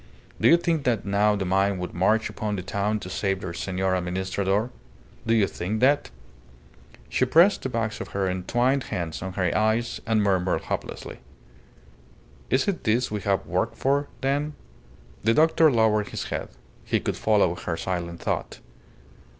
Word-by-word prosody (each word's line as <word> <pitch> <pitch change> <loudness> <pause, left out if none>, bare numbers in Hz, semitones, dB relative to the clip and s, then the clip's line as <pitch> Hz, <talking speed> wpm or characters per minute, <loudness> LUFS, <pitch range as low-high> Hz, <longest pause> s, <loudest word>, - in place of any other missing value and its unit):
Do - - +5
you 170 - +7
think 170 -3 0
that 120 -4 +1
now 105 +1 +2
the 100 -2 -2
mine 95 +1 +2
would 90 0 -5
march 105 +5 +2
upon 105 -1 -3
the 95 - -4
town 100 +3 -1
to - - -7
save 95 +1 -1
their 95 -3 -5
Senor 95 +1 -1
Administrador? 95 +5 -1 0.6
Do 115 - +3
you 110 -3 +4
think 100 +3 -3
that?" 140 +4 +3 1.0
She - - 0
pressed 165 +10 +5
the 130 - -3
backs 115 -3 -2
of - - -5
her 95 -1 -1
entwined 120 +9 0
hands 85 -3 -4
on 95 0 -5
her 90 -2 0
eyes 110 +2 +1
and 110 -2 +2
murmured 95 -2 +1
hopelessly - - -5 1.3
"Is 130 - +2
it 195 -3 -1
this 115 +2 +1
we 105 -1 -2
have 100 -1 0
worked - - -1
for, 140 +2 +1
then?" 145 +3 0 0.7
The 115 +2 +3
doctor 160 0 +5
lowered 110 -3 +2
his - - -4
head. - - -4 0.3
He - - 0
could - - -2
follow 105 -5 +2
her 85 -1 -4
silent 85 -2 -4
thought. - - -3
105 Hz, 165 wpm, -25 LUFS, 95-120 Hz, 1.3 s, you